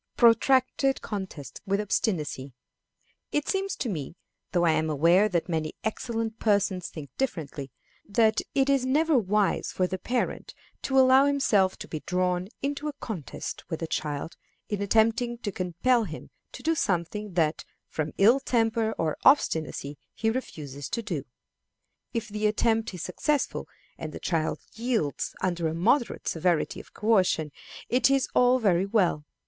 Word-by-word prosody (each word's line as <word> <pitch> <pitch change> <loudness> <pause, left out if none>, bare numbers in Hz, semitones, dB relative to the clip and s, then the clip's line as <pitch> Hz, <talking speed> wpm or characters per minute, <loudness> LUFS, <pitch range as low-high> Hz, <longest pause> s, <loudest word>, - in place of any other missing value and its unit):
Protracted 260 +3 +4
Contests 190 - -6
with 200 +1 +1
Obstinacy. 155 - -1 0.8
It 295 - 0
seems 390 -1 -1
to 255 - -3
me, 165 - -4 0.4
though 175 -1 +2
I 165 - +5
am 155 0 +1
aware 170 +8 +4
that 170 -4 0
many 160 -3 -2
excellent 225 0 -3
persons 195 -5 +1
think 150 -4 -9
differently, 155 - -3 0.4
that 220 +1 +3
it 270 -1 +3
is 275 -2 +3
never 300 +4 +2
wise 210 -3 +1
for 185 - +1
the 185 +1 -3
parent 245 +4 -2 0.3
to 265 - 0
allow 260 +1 +7
himself 215 -10 +2
to - - -8
be 155 - -4
drawn 180 +1 -1 0.2
into 285 +2 -2
a 300 - -3
contest 220 - -6
with 165 -1 -4
a - - +1
child 150 0 -3 0.3
in 205 -1 -2
attempting 225 +4 +2
to 215 -3 -4
compel 195 +7 +1
him 160 -4 -9 0.2
to - - -9
do 325 - +2
something 200 - -1
that 160 -3 +1 0.2
from 155 -1 -3
ill 230 +7 +6
temper 225 -3 +1
or 160 -2 -1
obstinacy 155 - +2 0.2
he 225 0 +1
refuses 145 - -6
to 235 - -2
do. 165 -10 -3 0.9
If 230 -2 -3
the 210 0 0
attempt 225 +1 +1
is 175 - -6
successful, 295 -3 -1 0.3
and 155 -1 -6
the - - -6
child 160 -3 -1
yields 225 - -1
under 175 -3 0
a 160 - -2
moderate 235 +9 +1
severity 170 0 0
of - - -13
coercion, 185 -8 +2 0.4
it 250 +2 +3
is 275 -1 +2
all 250 +1 +5
very 195 -5 +2
well. 185 -8 +1
205 Hz, 155 wpm, -27 LUFS, 165-240 Hz, 0.9 s, allow